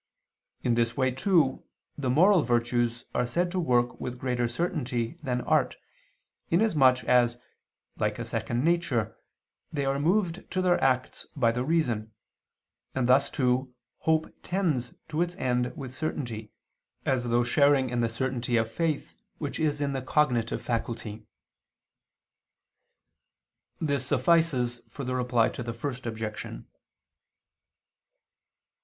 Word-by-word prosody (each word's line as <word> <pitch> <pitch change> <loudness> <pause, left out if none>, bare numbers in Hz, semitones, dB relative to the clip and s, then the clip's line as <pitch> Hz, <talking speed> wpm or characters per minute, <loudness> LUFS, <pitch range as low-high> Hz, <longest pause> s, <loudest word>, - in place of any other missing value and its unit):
In 120 - +2
this 115 0 +1
way 130 -1 +2
too, 145 0 +2 0.3
the 135 -3 -2
moral 180 +7 +5
virtues 120 -1 0
are 125 - +1
said 175 +8 0
to 185 - -1
work 125 -7 +1
with 125 0 -4
greater 125 -1 0
certainty 125 -2 -2
than 125 -4 -1
art, - - +2 0.7
in 170 - +3
as 220 -4 +2
much 130 -3 +5
as, 120 -1 +3 0.6
like - - 0
a - - -4
second 120 +2 -2
nature, 165 - +1 0.6
they 140 -2 -1
are 135 +1 0
moved 180 +3 0
to 185 - -2
their 180 -1 +2
acts 130 -1 0
by 120 -5 +3
the 125 +2 -2
reason: 120 -9 0 0.8
and 130 -2 +1
thus 130 +2 +5
too, 125 -2 0 0.2
hope 160 0 +1
tends 160 -10 -1
to 160 +1 -1
its 175 0 -1
end 125 -3 0
with 130 -4 -7
certainty, 120 -7 -4 0.5
as 130 -2 +1
though 120 0 +2
sharing 135 +1 +3
in 120 - -1
the 115 -1 +1
certainty 120 0 -1
of 115 0 0
faith 160 +1 -1 0.2
which 145 -3 -4
is 145 -2 0
in 140 -1 0
the 135 - -2
cognitive 125 -4 +1
faculty. 115 -2 -3 2.5
This 140 -4 0
suffices 135 -8 +2
for 140 - -7
the 130 0 -2
Reply 125 -2 +2
to - - -7
the 120 0 -4
First 125 +1 -5
Objection. 110 -1 -5
130 Hz, 135 wpm, -28 LUFS, 120-155 Hz, 2.5 s, moral